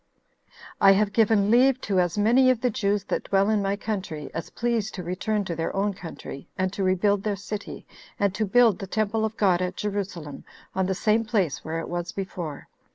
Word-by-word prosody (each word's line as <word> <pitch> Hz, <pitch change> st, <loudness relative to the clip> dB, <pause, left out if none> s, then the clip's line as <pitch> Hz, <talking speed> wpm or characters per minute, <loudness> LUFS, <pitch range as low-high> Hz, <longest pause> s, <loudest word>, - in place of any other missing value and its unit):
"I 195 Hz, 0 st, +8 dB
have 205 Hz, +1 st, +1 dB
given 215 Hz, -2 st, +3 dB
leave 255 Hz, +2 st, +5 dB
to 195 Hz, -2 st, 0 dB
as 175 Hz, +1 st, 0 dB
many 240 Hz, +5 st, +5 dB
of 255 Hz, -3 st, +2 dB
the 250 Hz, -, +1 dB
Jews 205 Hz, -3 st, 0 dB
that -, -, -3 dB
dwell 195 Hz, +2 st, +2 dB
in 215 Hz, -2 st, +2 dB
my 195 Hz, 0 st, 0 dB
country 190 Hz, -8 st, -5 dB
as 165 Hz, -, -5 dB
please 235 Hz, -3 st, -1 dB
to 180 Hz, -, -7 dB
return 200 Hz, +4 st, -1 dB
to 170 Hz, -, -3 dB
their 165 Hz, +1 st, -2 dB
own 200 Hz, +1 st, +1 dB
country, 165 Hz, -6 st, -9 dB
and 185 Hz, 0 st, -1 dB
to 200 Hz, -, -4 dB
rebuild 190 Hz, +2 st, +2 dB
their 210 Hz, 0 st, -1 dB
city, 200 Hz, +1 st, -7 dB, 0.3 s
and 200 Hz, -2 st, +2 dB
to 215 Hz, +2 st, -1 dB
build 225 Hz, -2 st, +4 dB
the 195 Hz, -, -6 dB
temple 215 Hz, +2 st, 0 dB
of 220 Hz, 0 st, -2 dB
God 185 Hz, -4 st, +3 dB
at 180 Hz, 0 st, -3 dB
Jerusalem 195 Hz, -8 st, -4 dB, 0.3 s
on 190 Hz, -1 st, 0 dB
the 190 Hz, -, 0 dB
same 215 Hz, +4 st, +2 dB
place 205 Hz, -, -1 dB
where 160 Hz, +1 st, -3 dB
it 165 Hz, -, -5 dB
was 175 Hz, 0 st, -4 dB
before. 175 Hz, -6 st, -6 dB
200 Hz, 210 wpm, -25 LUFS, 185-215 Hz, 0.3 s, I